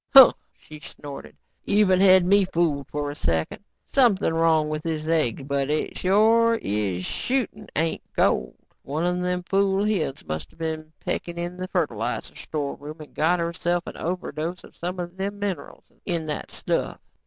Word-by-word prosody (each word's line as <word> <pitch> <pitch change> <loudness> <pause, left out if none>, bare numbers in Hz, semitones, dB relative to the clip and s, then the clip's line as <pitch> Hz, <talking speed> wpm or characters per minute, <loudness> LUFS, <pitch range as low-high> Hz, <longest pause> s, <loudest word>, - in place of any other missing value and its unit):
"Huh," 265 -3 +11 0.2
she 155 0 -12
snorted. 145 -1 -9 0.3
"Even 200 -3 +4
had 185 -2 +7
me 200 +2 +5
fooled 165 -6 0
for 145 0 -3
a - - -8
second. 80 - -1 0.2
Something 225 - +3
wrong 165 -2 +3
with 155 0 -3
this 155 -1 -3
egg 145 -5 +1
but 140 -1 0
it 155 +1 -1
sure 225 +4 +4
is 100 - -2
shootin' 245 -5 -2
ain't 160 +1 0
gold. - - +1 0.3
One 155 +5 -2
of 180 0 0
them 180 0 -1
fool 195 +1 +2
hens 180 -10 -1
must 80 0 -5
of - - -24
been 160 -1 -4
pecking 170 0 -3
in 175 +1 -3
the 185 0 -5
fertilizer - - -2
storeroom 150 +1 -5
and 155 - -11
got 170 +3 +2
herself 170 +1 -1
an - - -7
overdose 175 0 -4
of - - -15
some 180 +2 -4
of 175 +1 -5
them 200 +1 -3
minerals 200 -2 -5
in 170 -4 -1
that 150 -1 -4
stuff. - - -2
170 Hz, 165 wpm, -25 LUFS, 150-190 Hz, 0.3 s, Huh